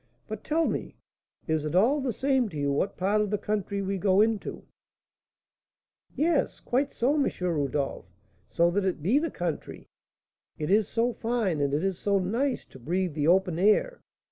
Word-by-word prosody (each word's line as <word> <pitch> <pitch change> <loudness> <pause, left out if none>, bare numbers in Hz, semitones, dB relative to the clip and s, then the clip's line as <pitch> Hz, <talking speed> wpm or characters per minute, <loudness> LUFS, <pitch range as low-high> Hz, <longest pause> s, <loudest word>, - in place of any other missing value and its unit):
But 215 -1 -6
tell 320 +2 +1
me, - - -3 0.5
is 160 -2 0
it 155 +2 -3
all 255 +10 +4
the 260 -2 -1
same 265 0 +1
to 155 - -8
you 140 -1 0
what 145 +8 -1
part 200 +3 +2
of 210 - -1
the 210 - 0
country 200 -1 -2
we 195 0 -2
go 190 0 +3
into?" 220 -1 0 1.5
"Yes, 315 0 +1
quite 275 +3 0
so, 255 +5 +1
M. 295 -2 +2
Rodolph, 145 - -1 0.4
so 170 +1 +2
that 200 +2 0
it 185 -6 -2
be 230 - +3
the 330 +1 -1
country. 175 - -5 0.7
It 150 +3 -2
is 210 0 +4
so 235 +1 0
fine 225 -11 -1
and 140 -1 +1
it 150 +4 0
is 195 -2 -1
so 200 -1 +1
nice 235 +9 -1
to 130 - -13
breathe 175 +6 -1
the 145 0 0
open 180 -1 +3
air! 215 - +2
200 Hz, 180 wpm, -27 LUFS, 170-240 Hz, 1.5 s, all